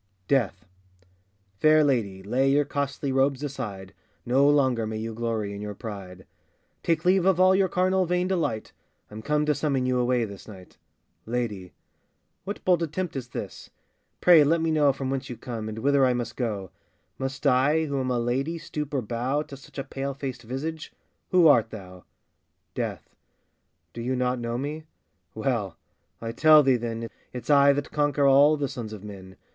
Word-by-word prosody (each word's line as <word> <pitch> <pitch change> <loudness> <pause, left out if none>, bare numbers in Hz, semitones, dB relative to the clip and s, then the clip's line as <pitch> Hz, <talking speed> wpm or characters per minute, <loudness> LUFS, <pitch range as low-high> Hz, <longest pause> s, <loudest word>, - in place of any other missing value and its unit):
] 95 -1 -43
DEATH. 115 -9 0 0.9
FAIR 155 0 +5
lady, 105 -9 0
lay 130 +7 +1
your 145 +1 +3
costly 140 -1 -3
robes 135 +1 +1
aside, 105 -9 -6 0.3
No 135 +4 +4
longer 130 -6 +2
may 110 0 -4
you 110 +1 -4
glory 110 -3 -2
in 100 - -7
your 105 -1 -5
pride; 95 -5 -8 0.6
Take 165 -1 0
leave 185 0 +4
of 190 -1 +3
all 185 0 +6
your 190 0 +3
carnal 185 0 +1
vain 180 +1 0
delight, 165 - -2 0.4
I'm 110 +1 -8
come 150 +4 0
to 150 - +2
summon 140 -3 -1
you 125 0 +1
away 125 -1 +1
this 100 -2 -11
night! 95 -4 -13 0.5
LADY. 110 -6 -3 0.7
What 205 +2 -6
bold 180 -2 +3
attempt 170 +2 -3
is 130 -3 -4
this? - - -7 0.5
pray 170 -4 +7
let 165 +4 +2
me 165 0 0
know 150 -3 +4
From 135 0 -4
whence 135 -1 -3
you 120 - -6
come, 115 -3 -6
and 110 - -7
whither 140 +3 +2
I 130 -1 +4
must 120 -2 -4
go? 105 -7 -3 0.5
Must 135 +2 -5
I, 140 +4 +3
who 140 -2 -2
am 130 -1 -2
a 125 - 0
lady, 130 +7 -1
stoop 150 -2 -5
or 130 - 0
bow 125 +7 -1
To 140 - -11
such 135 - -15
a 135 - -2
pale 135 0 -5
faced 130 -3 -5
visage? 145 +7 -5 0.4
Who 180 -3 +5
art 120 -7 +5
thou? 90 -4 -11 0.7
DEATH. - - -5 0.8
Do 115 - -6
you 130 +2 -1
not 125 0 0
know 120 0 -3
me? 150 +4 -5 0.5
well! - - -2 0.4
I 115 0 -4
tell 155 +5 +6
thee, 130 -2 +3
then, 115 -1 -4 0.3
It's 125 +4 -3
I 140 0 +6
that 145 0 -4
conquer 145 -1 +1
all 140 +3 +6
the 140 -1 -1
sons 120 -5 -7
of 105 -2 -9
men! 95 -2 -10
135 Hz, 185 wpm, -26 LUFS, 115-150 Hz, 0.9 s, pray